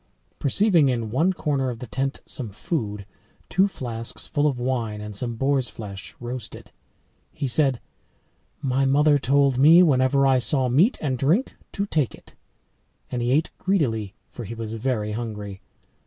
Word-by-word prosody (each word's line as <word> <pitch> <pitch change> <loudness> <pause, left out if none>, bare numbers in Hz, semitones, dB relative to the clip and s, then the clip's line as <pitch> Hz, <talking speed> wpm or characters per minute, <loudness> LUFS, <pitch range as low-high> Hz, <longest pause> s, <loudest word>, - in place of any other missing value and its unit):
Perceiving 165 - +4
in 115 -4 -2
one 160 +10 +2
corner 140 -7 -1
of 120 - -5
the 125 - -7
tent 135 +3 -3
some 120 -4 -6
food, 105 - -4 0.4
two 190 +3 +3
flasks 115 - -5
full 150 -1 +1
of 135 -4 -1
wine, 120 -4 -2
and 105 0 -7
some 120 +3 -3
boar's 135 +1 +1
flesh 100 -6 -9
roasted, 120 -1 -7 0.6
he - - -4
said, 135 -1 +2 0.8
"My 135 0 +1
mother 145 +2 +4
told 140 -1 +2
me, 165 +6 +8
whenever 135 -2 +3
I 135 -1 +4
saw 130 0 +1
meat 170 - +3
and 130 -5 -1
drink 170 - +1 0.2
to 200 - -1
take 155 - -1
it." - - -20 0.8
And 125 - -2
he 120 - 0
ate 150 +5 +2
greedily, 115 - 0
for 120 - -9
he 115 +2 -7
was 110 -1 -5
very 110 -2 -2
hungry. 105 -3 -5
130 Hz, 160 wpm, -24 LUFS, 115-145 Hz, 0.8 s, me